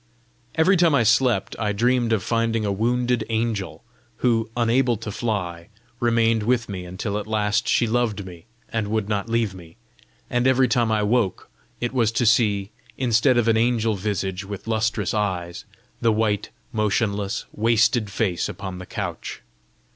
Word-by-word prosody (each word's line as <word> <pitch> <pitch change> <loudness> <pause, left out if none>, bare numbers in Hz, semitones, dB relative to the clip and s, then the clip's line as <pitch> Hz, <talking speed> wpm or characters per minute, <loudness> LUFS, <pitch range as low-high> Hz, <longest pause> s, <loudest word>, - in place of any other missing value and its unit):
Every 185 +4 +4
time 170 -4 +4
I 125 - +4
slept, 120 -2 +2
I 105 -2 0
dreamed 120 +2 +1
of 110 -4 +1
finding 115 -1 0
a 100 - 0
wounded 120 +4 +1
angel, 110 -3 -2 0.3
who, 115 -2 +1
unable 120 0 +2
to 110 0 -6
fly, 90 -7 -3 0.3
remained 115 -1 +2
with 115 +1 +1
me 95 -3 -6
until 100 +4 -3
at 105 - -7
last 105 0 0
she 120 - +3
loved 110 -3 0
me 90 -1 -11 0.2
and 110 -2 -2
would 110 -1 -1
not 105 +1 -2
leave 115 -3 0
me; 85 -3 -13 0.5
and 125 +1 +1
every 130 0 +4
time 120 -4 +1
I 105 -1 +2
woke, 105 -3 0 0.3
it 120 +1 -2
was 115 -4 +2
to 120 - +1
see, 105 -3 +2 0.3
instead 125 0 +3
of 120 -1 +2
an 115 -1 +4
angel 115 -1 +2
visage 95 -1 -2
with 100 0 -7
lustrous 110 -3 0
eyes, 90 -5 -2 0.4
the 115 - +3
white, 105 -2 0 0.2
motionless, 105 -1 0
wasted 115 0 +2
face 100 -4 -1
upon 95 -2 -6
the 90 - -9
couch. - - -5
110 Hz, 160 wpm, -23 LUFS, 100-120 Hz, 0.5 s, Every